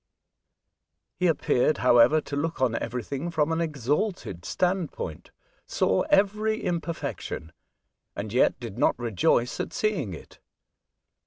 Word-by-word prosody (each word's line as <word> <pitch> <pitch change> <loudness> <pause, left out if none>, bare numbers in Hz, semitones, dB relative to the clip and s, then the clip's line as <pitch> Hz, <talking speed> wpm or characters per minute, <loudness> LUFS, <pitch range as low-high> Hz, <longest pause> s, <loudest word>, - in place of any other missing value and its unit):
He 180 - +3
appeared, 155 -3 +2
however, 125 +5 +5
to 145 - -6
look 160 +3 -2
on 130 -3 +2
everything 125 +7 -3
from 160 -1 +1
an 165 +1 0
exalted 150 - -2
standpoint, 175 - -2 0.4
saw 95 - +1
every 210 +2 +2
imperfection, 165 - -4 0.6
and 105 +1 -5
yet 125 - +3
did 115 -2 -7
not - - +3
rejoice 120 +1 +1
at - - -3
seeing 180 - -1
it. - - -14
145 Hz, 115 wpm, -26 LUFS, 120-175 Hz, 0.6 s, however